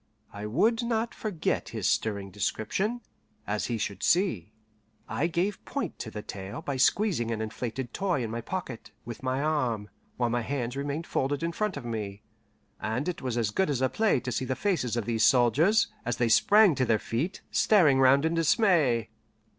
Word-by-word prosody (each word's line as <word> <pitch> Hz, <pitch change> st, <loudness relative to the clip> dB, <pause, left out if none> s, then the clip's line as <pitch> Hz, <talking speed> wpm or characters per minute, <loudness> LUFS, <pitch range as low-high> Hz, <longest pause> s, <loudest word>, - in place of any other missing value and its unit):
I 105 Hz, +1 st, -5 dB
would 220 Hz, -, +2 dB
not 235 Hz, -1 st, -1 dB
forget 200 Hz, -8 st, -2 dB
his -, -, -2 dB
stirring 100 Hz, -3 st, -1 dB
description, 190 Hz, -, -2 dB, 0.4 s
as 105 Hz, +1 st, -2 dB
he 120 Hz, -, -1 dB
should 100 Hz, -2 st, -4 dB
see. 145 Hz, -, +1 dB, 0.6 s
I 160 Hz, -, 0 dB
gave 175 Hz, +4 st, -1 dB
point 280 Hz, -, -4 dB
to 110 Hz, -, -5 dB
the 105 Hz, -1 st, -7 dB
tale 100 Hz, +10 st, -7 dB
by 140 Hz, -2 st, -3 dB
squeezing 165 Hz, -, +2 dB
an 115 Hz, -2 st, -2 dB
inflated 120 Hz, +3 st, -4 dB
toy 180 Hz, -10 st, 0 dB
in 110 Hz, -, -4 dB
my 115 Hz, +1 st, -3 dB
pocket, 130 Hz, -4 st, -6 dB, 0.2 s
with 120 Hz, -1 st, -7 dB
my 130 Hz, +1 st, -1 dB
arm, 125 Hz, -9 st, -1 dB, 0.3 s
while 120 Hz, -2 st, 0 dB
my 120 Hz, 0 st, 0 dB
hands 125 Hz, 0 st, -3 dB
remained 145 Hz, +4 st, -3 dB
folded 140 Hz, +1 st, -1 dB
in 170 Hz, -, 0 dB
front 210 Hz, 0 st, -2 dB
of 135 Hz, -, -7 dB
me; 105 Hz, -3 st, -5 dB, 0.6 s
and 120 Hz, +8 st, -2 dB
it 180 Hz, -, -3 dB
was 125 Hz, -2 st, -2 dB
as 110 Hz, -3 st, 0 dB
good 190 Hz, -, +1 dB
as 140 Hz, -4 st, 0 dB
a 130 Hz, 0 st, +2 dB
play 220 Hz, -, +2 dB
to 125 Hz, -, -4 dB
see 130 Hz, -, -1 dB
the 130 Hz, -, -2 dB
faces 125 Hz, -, -1 dB
of 115 Hz, -, -1 dB
these 115 Hz, -1 st, 0 dB
soldiers, 145 Hz, -, +4 dB
as 120 Hz, -, -2 dB
they 120 Hz, -1 st, +1 dB
sprang 205 Hz, -, +6 dB
to 130 Hz, -2 st, 0 dB
their 115 Hz, -2 st, +3 dB
feet, 135 Hz, -, -3 dB
staring 155 Hz, -11 st, +4 dB
round 135 Hz, +3 st, +5 dB
in 160 Hz, -, +1 dB
dismay. 160 Hz, -, +2 dB
130 Hz, 190 wpm, -28 LUFS, 115-170 Hz, 0.6 s, sprang